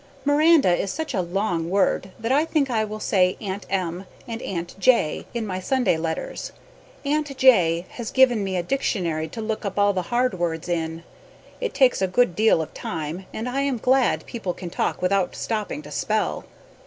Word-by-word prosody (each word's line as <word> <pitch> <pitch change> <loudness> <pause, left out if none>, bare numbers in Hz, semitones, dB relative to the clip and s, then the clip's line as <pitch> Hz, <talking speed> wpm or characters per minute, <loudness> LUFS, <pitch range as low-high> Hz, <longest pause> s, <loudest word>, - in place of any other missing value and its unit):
Miranda 290 - +5
is 190 +2 -2
such 320 -2 -4
a 190 - +1
long 175 -2 -1
word 195 0 +1
that 225 +2 -3
I 285 +3 +4
think 300 -5 0
I 220 -2 +1
will 215 0 -5
say 185 -3 +2
Aunt 195 -1 -5
M. 185 -1 -2 0.2
and 230 -1 -5
Aunt 175 -2 -4
J. 235 -9 +2
in 235 -2 -3
my 185 -2 -3
Sunday 245 -1 +1
letters. 165 - -4 0.5
Aunt 290 -1 -1
J. 180 -10 +5
has 235 -3 -6
given 245 -5 +4
me 190 -1 -2
a 175 - -1
dictionary 170 - -1
to 225 +8 -7
look 215 0 -3
up 200 -1 -4
all 205 0 +4
the 185 - 0
hard 240 -5 +1
words 165 -1 -2
in. 165 -1 -2 0.6
It 485 -3 -3
takes 260 -7 +4
a 190 - +2
good 185 -2 +2
deal 215 -7 +4
of - - -11
time 160 +4 -5
and 225 +3 -4
I 265 +2 -1
am 275 -3 0
glad 255 +2 +2
people 195 -7 -4
can 175 -2 -7
talk - - -2
without 185 0 +1
stoping 220 +6 -3
to - - -11
spell. - - -1
205 Hz, 190 wpm, -24 LUFS, 180-250 Hz, 0.6 s, Miranda